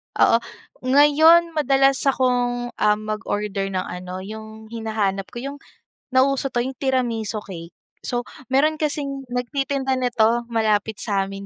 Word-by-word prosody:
Oo. 230 - +5 0.5
Ngayon 315 +5 +6
madalas 270 -2 +3
akong, 245 -2 +1
ah, 210 0 +3
mag-order 210 -2 -3
ng 185 - 0
ano 180 +1 -7
yung 220 +1 -9
hinahanap 215 -4 -2
ko - - -7
yung 280 +2 -6 0.5
nauso 270 +1 +2
'to 240 - -1
yung 265 - -4
tiramisu 240 -5 -1
cake. 170 -3 -9 0.3
So, 245 0 -3 0.2
mayro'n 300 +4 +2
kasing 280 -3 -2
nagtitinda 265 +2 -1
nito 240 -2 +2
malapit 220 -2 +1
sa 200 -3 0
amin 195 0 -8
245 Hz, 130 wpm, -22 LUFS, 215-270 Hz, 0.5 s, Ngayon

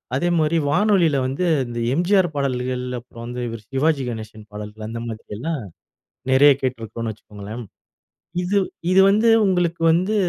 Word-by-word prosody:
அதே 175 +6 +1
மாதிரி 155 +2 +2
வானொலியில 175 -3 +3
வந்து 135 +7 -2 0.2
இந்த 120 0 -5 0.2
எம்ஜிஆர் 180 -1 +2
பாடல்கள் 125 -2 -1
அப்புறம் 115 -1 -11
வந்து 125 0 -4
இவர் 115 -2 -7
சிவாஜி 140 0 +1
கணேசன் 110 -2 -8
பாடல்கள். 105 +1 -7
அந்தமாதிரியெல்லாம் 115 +5 -5 0.7
நிறைய 145 +2 +7
கேட்டிருக்கிறோம்னு 115 -3 -3
வச்சுக்கோங்களேன். 105 +3 -9 0.8
இது, 200 +3 +1 0.3
இது 190 - +6
வந்து 215 +3 +3 0.2
உங்களுக்கு 175 -3 0
வந்து 185 +6 +1
130 Hz, 130 wpm, -22 LUFS, 115-170 Hz, 0.8 s, நிறைய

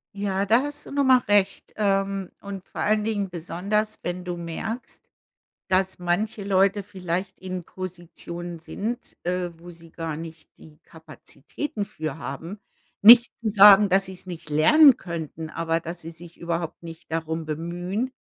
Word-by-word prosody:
Ja, 200 -1 -1
da 230 +5 +4
hast 290 0 -5
du - - -11
nochmal 265 -3 +4
recht, 200 -1 +2
ähm, 195 -2 0
und 195 -2 -7
vor - - -6
allen 215 0 +2
Dingen 205 -3 -1
besonders, 180 +6 -2
wenn 180 +1 -4
du 175 -1 -3
merkst, 195 +8 -6 0.6
dass 190 0 +1
manche 200 +4 -1
Leute 195 +1 +2
vielleicht 185 -1 -4
in 185 -2 -6
Positionen 175 -1 -7
sind, 230 +8 -6
äh, 180 0 -1
wo 175 +1 -12
sie 165 -1 -13
gar 165 -2 -4
nicht 160 0 -10
die 155 -1 -16
Kapazitäten 160 - -7
für 160 -6 -5
haben. 165 +8 -7 0.4
Nicht 235 +3 +8
zu 225 -2 -1
sagen, 205 0 +8
dass 195 +1 +3
sie's 190 0 -8
nicht 170 -4 -8
lernen 265 - +7
könnten, 160 - -6
aber 165 0 -1
dass 170 +1 -7
sie 165 - -7
sich 170 +1 -13
überhaupt 170 -1 -4
nicht 165 -1 -11
darum 160 0 -2
bemühen. 175 - -3
180 Hz, 155 wpm, -24 LUFS, 165-205 Hz, 0.6 s, Nicht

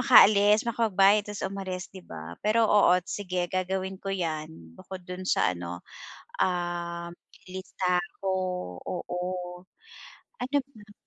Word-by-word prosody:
makaalis, 210 -3 +7
makapagbayad, 210 -3 +3
tapos 210 - -4
umalis, 185 -2 -4
'di 190 - -9
ba? 80 - -8
Pero, 225 +2 +3
oo, 205 -4 +6
sige, 185 -3 -2
gagawin 190 +1 -2
ko 195 - -6
'yan. 160 -5 -2 0.2
Bukod 185 - -9
do'n 180 +1 -6
sa 90 - +3
ano, 85 0 -6 0.6
um, 175 -1 -1 0.4
listahan 180 -1 -1
ko, 190 - +2 0.5
oo. 180 - -4 1.3
Ano 265 +3 0
pa? 215 -6 -16
185 Hz, 120 wpm, -28 LUFS, 175-205 Hz, 1.3 s, makaalis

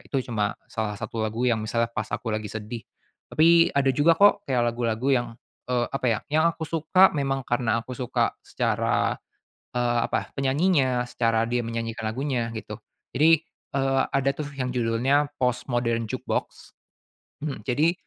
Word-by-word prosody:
itu 140 - -4
cuma 105 -3 0 0.2
salah 110 -2 -3
satu 115 - -4
lagu 110 +2 -3
yang 115 - +2
misalnya 115 +2 0
pas 110 - -2
aku 110 +2 -3
lagi 110 0 -2
sedih. 110 +1 -6 0.5
Tapi 165 +2 +5
ada 140 -1 +3
juga 145 +5 +4
kok 200 +3 +4
kayak 130 -3 +1
lagu-lagu 120 +2 -1
yang, 120 -3 +2 0.4
eee, 125 -1 0
apa 135 -2 -2
ya, 110 - 0
yang 155 +2 +3
aku 160 - -10
suka 165 +4 +4
memang 135 -1 0
karena 120 -2 +1
aku 130 - -13
suka 125 -3 -1
secara, - - 0 0.6
eee, 120 -1 +1
apa, - - -2
penyanyinya, 135 -3 +2
secara 115 -1 +1
dia 120 0 0
menyanyikan 115 -1 -4
lagunya 120 0 -2
gitu. 110 -2 -6 0.4
Jadi, 160 +2 +5 0.3
eee, 135 -1 +2
ada 135 0 +1
tuh 145 -2 -5
yang 130 -2 -3
judulnya 125 +4 +1
Postmodern 120 -2 0
Jukebox. 110 - -4 0.7
Mhm, 145 -3 -4
jadi 150 +7 +3
125 Hz, 155 wpm, -25 LUFS, 115-140 Hz, 0.7 s, Tapi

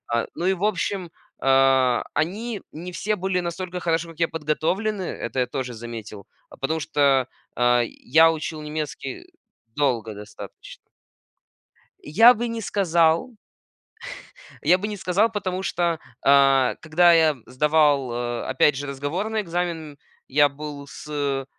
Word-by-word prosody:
а. 115 - 0
Ну 175 - -3
и 190 - +3
в 190 +2 -6
общем, 195 -3 -1 0.3
а, 135 -2 +3
они 210 +6 -2
не 175 +4 -8
все 215 +4 -1
были 185 0 -1
настолько 180 +1 -5
хорошо, 165 0 0
как 165 - -18
я, 165 - +4
подготовлены. 165 +7 -1
Это 130 -6 -4
я - - +2
тоже 130 -2 -4
заметил, 110 -3 -8 0.4
потому 160 +4 -1
что, 140 -4 +2 0.3
а, 120 0 +4
я 160 +8 +3
учил 155 0 -5
немецкий 150 - -5 0.5
долго 120 -7 0
достаточно. 105 +1 -11 1.2
Я 225 +11 +7
бы 235 +2 -3
не 230 0 -4
сказал. 170 +2 +1 1.3
Я 180 - +4
бы 205 - -4
не 210 - -4
сказал, 200 +5 +1
потому 190 -3 -3
что, 170 -2 0 0.2
а, 135 -2 +5
когда 170 +2 +4
я 160 -2 +4
сдавал, 145 0 +2
а, 120 0 -3
опять 135 +2 +3
же 145 +2 -5
разговорный 170 +11 -2
экзамен, 170 -4 -4 0.3
я 145 +2 +4
был 145 0 -8
с 140 -2 -3
155 Hz, 135 wpm, -23 LUFS, 135-180 Hz, 1.3 s, Я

